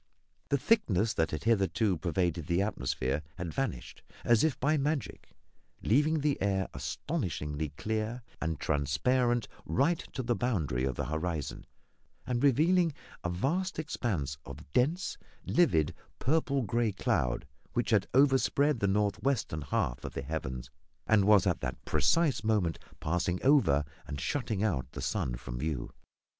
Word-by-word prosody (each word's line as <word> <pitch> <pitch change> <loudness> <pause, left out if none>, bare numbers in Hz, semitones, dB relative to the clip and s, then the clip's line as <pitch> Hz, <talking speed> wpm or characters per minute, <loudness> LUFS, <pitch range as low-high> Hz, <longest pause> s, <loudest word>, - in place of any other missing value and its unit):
The 140 - +3
thickness 115 - +2
that 80 - +1
had 80 - -4
hitherto 100 -2 +2
pervaded 85 0 -1
the 90 +2 +2
atmosphere 65 - -1
had 85 -3 -5
vanished, 135 -8 -3 0.2
as 120 -2 +4
if 160 -3 +1
by 145 +4 +2
magic, 145 -4 -2 0.5
leaving 150 +6 +3
the 145 -1 0
air 95 -1 +1
astonishingly 80 - -3
clear 110 +2 -2 0.2
and 80 -2 -2
transparent 115 - +1 0.2
right 140 - +1
to 130 - -3
the 120 0 +1
boundary 80 - 0
of 65 -2 -1
the - - -2
horizon, 80 -1 -3 0.6
and 125 0 -1
revealing 160 +5 +4 0.3
a 90 - -1
vast 160 - -1
expanse 95 - -2
of 70 - -11
dense, 160 +9 +1 0.3
livid, 85 - +3 0.2
purple 140 -1 +1
grey 115 0 +1
cloud, 60 -9 0 0.3
which 120 0 0
had 105 -3 +3
overspread 140 0 +4
the 100 - +1
north 100 +1 +1
western 125 - 0
half 60 -4 -1
of - - -6
the 70 - -3
heavens, 65 -5 -4 0.3
and 105 -3 +4
was 105 -2 +6
at 90 -3 +1
the - - -2
precise 150 -10 +2
moment 105 -8 +1 0.2
passing 90 +2 0
over 130 - +4 0.2
and 70 - -5
shutting 110 - -1
out 70 -11 -1
the - - -6
sun - - -1
from - - -6
view. 75 -3 -3
105 Hz, 145 wpm, -31 LUFS, -, 0.6 s, was